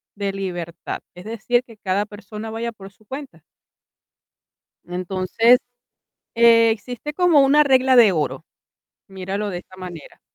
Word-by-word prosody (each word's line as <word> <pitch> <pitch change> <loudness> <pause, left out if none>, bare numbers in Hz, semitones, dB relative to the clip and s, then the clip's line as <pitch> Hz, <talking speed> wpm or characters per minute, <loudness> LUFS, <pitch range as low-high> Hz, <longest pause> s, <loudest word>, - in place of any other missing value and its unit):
de 200 -1 -2
libertad, 175 -3 -5 0.2
es 180 - -12
decir, 230 +2 0
que 230 -3 -16
cada 200 0 -1
persona 210 +1 -9
vaya 230 +1 -3
por 195 -3 -13
su 205 - -27
cuenta. 260 - -9 1.4
Entonces, 185 +6 +2 0.8
existe 230 +3 +3
como 345 -2 +4
una 280 +2 +5
regla 260 -1 +4
de 225 -5 +7
oro. 150 -3 -2 0.6
Míralo 195 +2 -4
de 180 - -4
esta 185 +1 -15
manera. 180 -4 -10
210 Hz, 130 wpm, -21 LUFS, 185-240 Hz, 1.4 s, de